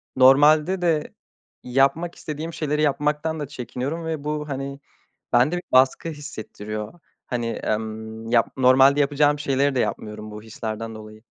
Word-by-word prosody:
normalde 150 +7 +5
de 165 -4 0 0.5
yapmak 140 +7 +1
istediğim 155 +2 -6
şeyleri 150 -1 -1
yapmaktan 150 +2 0
da 145 - -4
çekiniyorum 140 +4 -5
ve 160 -3 -3
bu, 150 0 -3
hani, 140 0 -4 0.5
bende 125 +8 +4
bir 175 - -5
baskı 130 +5 +4
hissettiriyor. 110 -4 -7 0.3
Hani, 120 -2 -2
emm, 110 0 -4
yap 115 -3 +4
normalde 130 +2 +5
yapacağım 145 +1 +2
şeyleri 140 -1 +1
de - - +1
yapmıyorum 105 -2 -3
bu 105 0 -8
hislerden 110 0 -6
dolayı. 110 0 -12
135 Hz, 135 wpm, -23 LUFS, 115-150 Hz, 0.5 s, normalde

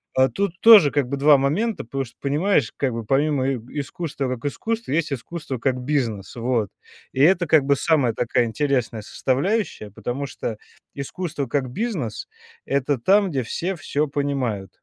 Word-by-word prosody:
А 130 0 +5
тут 175 +7 -3
тоже 210 -11 +9
как 145 -4 +1
бы 140 +2 -3
2 145 +1 +6
момента, 185 +12 0
потому 135 +3 -3
что, 120 - -13
понимаешь, 145 - +1
как 135 -2 0
бы, 115 -2 -5
помимо 135 +1 +1
иэ - - -2 0.2
искусства 140 -1 -4
как 115 - -13
искусство, 225 +2 -4
есть 150 -1 0
искусство 140 +1 -5
как 130 0 0
бизнес, 125 -8 -2
вот. 115 -3 0 0.4
И 135 - 0
это 175 +1 +4
как 155 -3 +5
бы 140 +1 +3
самая 140 -8 +2
такая 120 +1 +1
интересная 120 -2 -1
составляющая, 135 - -1
потому 125 +7 -4
что 115 -5 -5 0.4
искусство 145 +1 -4
как 130 +1 -1
бизнес- 155 - -3 0.4
это 140 0 0
там, 195 - +4
где 135 -6 -1
все 180 +11 -3
всё 150 -1 -1
понимают. 135 -9 -2
140 Hz, 165 wpm, -23 LUFS, 125-160 Hz, 0.4 s, тоже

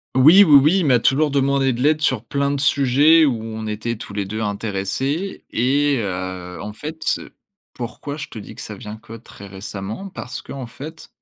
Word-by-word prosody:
Oui, 160 +10 +8
oui, 150 -6 +8
oui, 160 +7 +4
il 170 - 0
m'a 125 -3 +5
toujours 145 +5 +2
demandé 135 -1 +2
de 120 - -4
l'aide 155 +2 +3
sur 130 -6 0
plein 140 +3 0
de 140 - -2
sujets 145 +3 +4
où 120 -6 0
on 110 -1 -6
était 110 +2 -3
tous 105 - -9
les 100 -1 -2
2 110 +3 -4
intéressés 110 - -3
et 140 +3 +2
heu, 90 -3 -5
en 105 0 -6
fait, 155 +7 -7
ce - - -1 0.4
pourquoi 140 +4 -6
je 135 - -6
te - - -11
dis 105 - -9
que - - -10
ça 105 - -7
vient 105 +1 -8
que 110 +1 -13
très 110 -3 -12
récemment? 100 - -7
Parce 145 -6 -7
qu'en 135 -3 -7
fait 155 +7 -10
125 Hz, 205 wpm, -21 LUFS, 105-145 Hz, 0.4 s, Oui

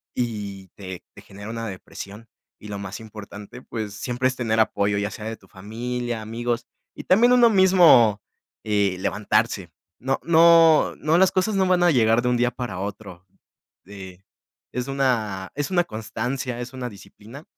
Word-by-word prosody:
y 105 -5 -4
te 95 -3 -8
te - - -14
genera 100 +2 -11
una 115 0 -5
depresión. 100 +2 -9 0.3
Y 105 - -11
lo 100 -1 -5
más 100 0 -7
importante, 105 +1 -11
pues 110 -5 -6
siempre 125 +4 -1
es 130 - -2
tener 115 -3 -1
apoyo, 100 -2 +1
ya 100 0 -2
sea 105 - -8
de 110 0 -5
tu - - -22
familia, 120 +4 -5
amigos 115 +2 -3 0.3
y - - -8
también 230 +6 +4
uno 245 -2 +6
mismo, 175 - +5 0.4
eh, 100 -3 0
levantarse. 105 -2 -1 0.3
No 135 +2 -1
no 165 -1 +5
no 155 +2 +1
las 190 0 +4
cosas 190 +3 0
no 190 -1 +2
van 180 -1 +3
a 175 - +5
llegar 115 -3 +3
de 125 - +1
un 125 - +1
día 120 +1 +2
para 120 -9 -6
otro, 95 -2 -7 0.6
eh, 95 -2 -11 0.5
es 125 +2 -4
una 115 -9 -1
es 145 +3 -3
una 175 -2 +2
constancia, 125 +2 -4
es 125 +2 -7
una 130 -1 -5
disciplina, 115 +6 -13
115 Hz, 170 wpm, -23 LUFS, 100-130 Hz, 0.6 s, uno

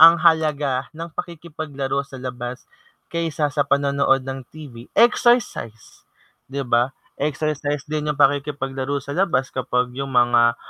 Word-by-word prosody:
ang 165 +1 +10
halaga 150 -5 +2
ng 165 +1 -5
pakikipaglaro 155 -5 -4
sa 140 -1 -11
labas, 125 -1 -6 0.5
kaysa 165 -3 0
sa 145 - +2
panonood 140 -1 +2
ng 135 0 -4
TV? 130 -6 -11
Exercise, 235 - +2 0.5
'di 140 0 -2
ba? 120 +2 +3 0.3
Exercise 145 0 -1
din 150 0 -2
yung 150 - -3
pakikipaglaro 140 -1 +1
sa 140 +1 -7
labas 165 -8 +1
kapag 125 -1 0
yung 135 0 -4
mga 120 -1 +4
140 Hz, 130 wpm, -22 LUFS, 130-155 Hz, 0.5 s, ang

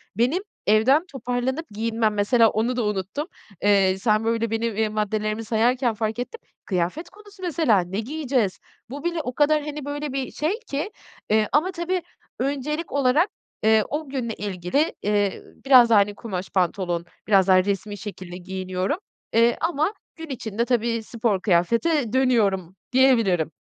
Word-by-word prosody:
Benim 255 - +1 0.2
evden 245 - +4
toparlanıp 260 0 -3
giyinmem, 220 +1 0
mesela, 220 +3 +4
onu 225 +4 0
da 245 - 0
unuttum. 210 - -2 0.3
Eee, 195 -2 +4
sen 215 +2 +1
böyle 230 0 0
benim, 225 -1 -1
eee, 220 -1 +1
maddelerimi 215 +1 -1
sayarken 240 +2 +2
fark 220 +2 -3
ettim. 455 - -5 0.2
Kıyafet 185 - -2
konusu 410 0 -17
mesela, 320 - +2
ne 180 +3 -3
giyeceğiz? 255 -5 -1 0.3
Bu 280 +3 -7
bile 345 -1 -1
o 250 -4 -5
kadar, 300 +2 +3
hani, 300 -1 -6
böyle 290 -1 -4
bir 270 -1 -3
şey 340 +9 -1
ki, 370 - -4 0.4
eee, 215 0 +3
ama 335 +6 +2
tabii 360 +1 -2 0.4
öncelik 285 +4 -2
olarak, 285 +7 +3 0.3
eee, 220 0 +5
o 300 0 -3
günle 250 -4 -3
ilgili, 205 - -1
eee, 205 -1 0 0.2
biraz 255 -3 +7
daha, 220 -3 +6
hani, 205 0 +1
kumaş 195 -5 -5
pantolon, 175 -2 0 0.2
biraz 195 -3 +4
daha 185 -1 +6
resmî 205 +1 -2
şekilde 185 -4 -8
giyiniyorum, 185 - -3 0.4
eee, 230 +1 +4
ama 330 +3 0 0.2
gün 325 -1 -9
içinde 230 -3 -2
tabii 235 -2 0
spor 220 -4 -1
kıyafete 230 - +2
dönüyorum 205 -9 +2 0.2
diyebilirim. 230 - +3
230 Hz, 150 wpm, -24 LUFS, 205-285 Hz, 0.4 s, biraz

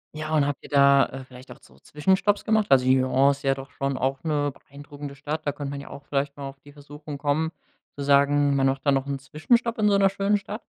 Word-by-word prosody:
Ja, 155 0 -4
und 150 - +3
habt 145 -2 -2
ihr - - -12
da, 140 -1 +5
äh, 135 0 -9
vielleicht 130 0 -14
auch - - -12
so 65 - -21
Zwischenstopps 190 - 0
gemacht? 220 -1 +2
Also, 130 -2 +5
Lyon 130 +1 +3
ist 140 +1 -2
ja 135 -1 +2
doch 135 +1 -9
schon 140 0 -3
auch 135 +1 -2
'ne 145 -3 0 0.2
beeindruckende 145 0 -10
Stadt. 150 +3 -5
Da 145 - +1
könnte 140 0 -6
man 140 0 -6
ja - - -12
auch 140 - -10
vielleicht 140 0 -2
mal 140 -1 -7
auf 135 0 -14
die 145 - -16
Versuchung 145 0 -10
kommen 150 +2 0 0.4
zu 140 - -5
sagen, 140 0 +3
man 135 -1 +2
macht 135 0 0
da 140 - +4
noch 135 -1 +1
'n 140 -1 -4
Zwischenstopp 230 - 0
in 215 -1 +2
so 205 - +3
'ner 195 -1 +4
schönen 200 +1 +1
Stadt? 205 +2 -8
145 Hz, 250 wpm, -25 LUFS, 135-155 Hz, 0.4 s, da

